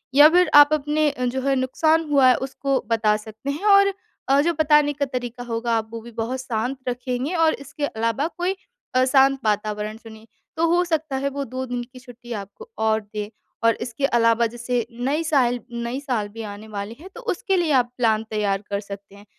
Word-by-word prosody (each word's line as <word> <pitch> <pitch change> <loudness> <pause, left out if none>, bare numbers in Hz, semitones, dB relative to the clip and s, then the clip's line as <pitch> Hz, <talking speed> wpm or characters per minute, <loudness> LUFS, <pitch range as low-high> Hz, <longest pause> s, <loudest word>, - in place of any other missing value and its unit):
या 295 +2 +9
फिर 360 +2 +4
आप 290 +1 +8
अपने 300 0 +1
जो 250 +1 -1
है 275 - +3
नुकसान 315 +5 +1
हुआ 275 -3 +5
है 250 - +5
उसको 275 0 -1
बता 215 -2 +3
सकते 220 +5 -8
हैं 300 +8 -5
और 395 -1 +6 0.4
अ, 275 +1 +5
जो 340 +3 +1
बताने 300 -2 +3
का 280 0 -1
तरीका 245 -2 -5
होगा 235 0 -3
आप 220 0 -4
वो 230 - -4
भी 235 +1 -11
बहुत 235 +3 -3
शांत 245 +2 -2
रखेंगे 250 +5 -3
और 325 -1 +3
इसके 285 +1 -5
अलावा 230 +6 -1
कोई 360 +2 -1 0.4
अ, 255 - +5
शांत 270 +1 +4
वातावरण 210 +1 -1
चुनिए, 225 -1 -14 0.3
तो 335 - +2
हो 350 +2 +3
सकता 315 -4 -1
है 275 +1 -1
वो 280 0 -4
2 255 +2 -5
दिन 245 -1 -4
की 255 +1 -14
छुट्टी 245 -1 -13
आपको 205 - -8
और 220 0 +2
दें। 210 0 -6 0.4
और 230 - +5
इसके 240 +3 -2
अलावा 230 -2 +3
जैसे 240 0 -2
नई 270 +7 -1
साल 250 -6 +2
नई 235 +2 -3
साल 245 -7 -2
भी 225 +2 -8
आने 205 +1 -8
वाली 205 +2 -6
है 370 - -10
तो - - -8
उसके 385 +2 -1
लिए 335 -4 +1
आप 245 -2 +2
प्लान 220 -2 +2
तैयार 205 -2 0
कर 200 - -1
सकते 200 -1 -10
हैं। 200 +1 -15
250 Hz, 205 wpm, -23 LUFS, 225-290 Hz, 0.4 s, या